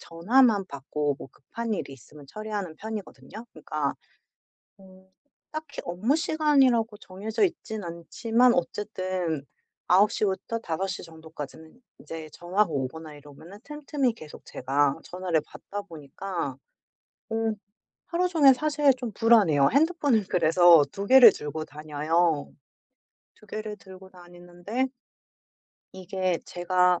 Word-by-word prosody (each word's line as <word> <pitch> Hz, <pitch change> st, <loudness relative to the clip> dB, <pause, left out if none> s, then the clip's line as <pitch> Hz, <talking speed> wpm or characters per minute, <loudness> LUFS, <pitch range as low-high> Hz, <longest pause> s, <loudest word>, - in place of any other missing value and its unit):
전화만 205 Hz, +5 st, +3 dB
받고 145 Hz, 0 st, -2 dB
뭐 -, -, -10 dB
급한 230 Hz, -, -6 dB
일이 140 Hz, -, -4 dB
있으면 140 Hz, +2 st, -15 dB
처리하는 205 Hz, -3 st, -5 dB
편이거든요. 210 Hz, -, -8 dB
그러니까 150 Hz, -2 st, -3 dB, 0.8 s
어 190 Hz, -1 st, -18 dB, 0.4 s
딱히 310 Hz, -2 st, -6 dB
업무 205 Hz, -, 0 dB
시간이라고 270 Hz, -9 st, +2 dB
정해져 205 Hz, -, -3 dB
있진 220 Hz, -, -2 dB
않지만 225 Hz, +9 st, +1 dB
어쨌든 185 Hz, -5 st, -2 dB, 0.4 s
9:00 205 Hz, +3 st, +4 dB
부터 200 Hz, +4 st, -2 dB
5:00 190 Hz, -1 st, -3 dB
정도까지는 160 Hz, -, -10 dB, 0.2 s
인제 160 Hz, -1 st, -8 dB
전화가 185 Hz, +5 st, +1 dB
오거나 150 Hz, +3 st, -4 dB
이러면은 155 Hz, +7 st, -14 dB
틈틈이 290 Hz, -4 st, -2 dB
계속 155 Hz, -9 st, -12 dB
제가 140 Hz, +2 st, 0 dB
전화를 180 Hz, -3 st, -1 dB
받다 205 Hz, 0 st, -8 dB
보니까 165 Hz, -2 st, -6 dB, 0.7 s
어 225 Hz, -, -2 dB, 0.7 s
하루 360 Hz, +1 st, 0 dB
종일 305 Hz, -6 st, +6 dB
사실 290 Hz, 0 st, +2 dB
좀 245 Hz, -3 st, -5 dB
불안해요. 200 Hz, -11 st, +4 dB
핸드폰을 285 Hz, -, +2 dB
그래서 170 Hz, -1 st, +6 dB
2 200 Hz, +1 st, -5 dB
개를 255 Hz, -4 st, +9 dB
들고 155 Hz, +1 st, -5 dB
다녀요. 155 Hz, +1 st, -1 dB, 0.8 s
2 215 Hz, -, -20 dB
개를 215 Hz, 0 st, -5 dB
들고 190 Hz, -1 st, -14 dB
다니는데 175 Hz, +7 st, -5 dB, 1.1 s
이게 185 Hz, -1 st, -2 dB
제가 180 Hz, 0 st, +2 dB
185 Hz, 265 characters per minute, -26 LUFS, 160-225 Hz, 1.1 s, 개를